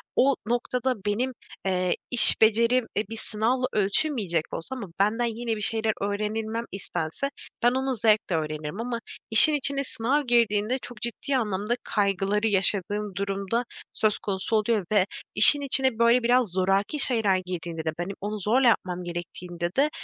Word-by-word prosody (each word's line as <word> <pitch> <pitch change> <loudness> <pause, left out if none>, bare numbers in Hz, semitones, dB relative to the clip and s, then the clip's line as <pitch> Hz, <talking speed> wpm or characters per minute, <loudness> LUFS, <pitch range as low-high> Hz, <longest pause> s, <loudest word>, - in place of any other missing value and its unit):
o 275 +1 +3
noktada 250 +2 -1
benim, 230 +6 -1 0.3
eee, 185 -1 0 0.2
iş 245 - +8
becerim, 230 +3 +3
e, 210 - -1
bir 225 - -7
sınavla 230 +5 -1
ölçülmeyecek 200 - 0
olsa 260 +10 -5
ama 230 -7 -7
benden 220 +4 +1
yine 235 -2 -2
bir 210 - -7
şeyler 220 +1 0
öğrenilmem 215 +3 -3
istense, 175 - -4 0.3
ben 240 - +5
onu 265 +1 -1
zevkle 215 -5 +1
öğrenirim 155 +4 -4
ama 235 -1 -4 0.3
işin 225 +8 +9
içine 280 -1 +1
sınav 265 +3 -1
girdiğinde 230 -1 +2
çok 240 -3 -9
ciddi 240 +3 -2
anlamda 210 0 -2
kaygıları 200 +1 0
yaşadığım 205 0 0
durum 195 0 -4
da 235 +2 0 0.3
söz 215 -1 +1
konusu 195 +2 -2
oluyor 215 -2 0
ve 205 -3 +3 0.3
işin 285 +8 +7
içine 265 -4 +2
böyle 235 +1 +4
biraz 245 -3 +2
zoraki 195 - 0
şeyler 220 -8 +2
girdiğinde 170 -2 -5
de 160 - 0
benim 190 +3 -4
onu 210 +1 -4
zorla 240 +7 +2
yapmam 180 -6 0
gerektiğinde 175 0 -6
de, 285 +2 +3
215 Hz, 155 wpm, -25 LUFS, 195-240 Hz, 0.3 s, işin